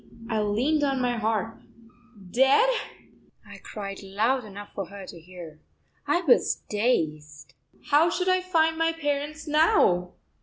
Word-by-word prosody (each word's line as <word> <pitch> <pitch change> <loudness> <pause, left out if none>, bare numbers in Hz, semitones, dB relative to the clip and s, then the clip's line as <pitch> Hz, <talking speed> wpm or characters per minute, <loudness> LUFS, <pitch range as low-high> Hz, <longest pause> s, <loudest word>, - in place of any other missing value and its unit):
I 220 -1 +1
leaned 250 +9 +1
on 275 -2 +1
my 245 -1 0
harp. 225 0 -2 0.7
"Dead!" 270 - +4 0.8
I - - -12
cried 195 -2 -7
loud 220 +7 0
enough 205 0 -10
for 195 -3 -5
her 200 0 -10
to 175 - -11
hear. 165 -3 -12 0.5
I 350 - +2
was 290 -9 +2
dazed. 155 - -2 0.4
How 305 +4 +5
should 360 +2 -2
I 370 0 +3
find 320 -3 +1
my 330 0 +2
parents 295 0 -3
now? 295 - +3
240 Hz, 140 wpm, -26 LUFS, 195-305 Hz, 0.8 s, How